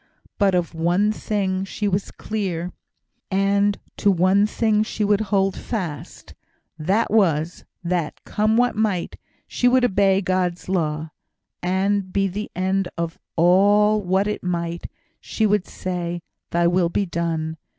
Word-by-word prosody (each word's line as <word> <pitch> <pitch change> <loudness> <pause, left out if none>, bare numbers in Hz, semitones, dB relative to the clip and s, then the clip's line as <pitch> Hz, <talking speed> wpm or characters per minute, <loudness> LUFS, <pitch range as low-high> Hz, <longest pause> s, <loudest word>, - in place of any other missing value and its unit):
But 195 -3 +3
of 175 -1 -1
one 175 +6 +2
thing 195 -3 -1
she 205 +2 -3
was 195 0 -1
clear, 180 -5 -3 0.6
and 200 +1 +2 0.2
to 205 - +2
one 190 +2 +4
thing 215 -1 +1
she 215 0 -2
would 205 0 +2
hold 195 -2 +1
fast: 175 -11 -6 0.5
that 195 +9 +1
was, 170 -6 +1 0.2
that, 170 -3 -2
come 215 +1 +1
what 245 0 +2
might, 210 -5 -1 0.3
she 245 - +1
would 250 0 +4
obey 195 -3 +3
God's 185 -2 -1
law, 155 -4 -1 0.5
and, 190 +1 0
be 195 0 +1
the 205 +3 -5
end 190 +1 0
of 170 -1 -3 0.2
all 205 +5 +4
what 190 +1 +1
it 210 0 -3
might, 170 -1 -3 0.3
she 220 - -1
would 205 -3 +1
say, 175 -2 -4 0.3
"Thy 170 0 +1
will 175 0 +3
be 200 +3 0
done!" 165 -2 -2
190 Hz, 140 wpm, -22 LUFS, 175-205 Hz, 0.6 s, one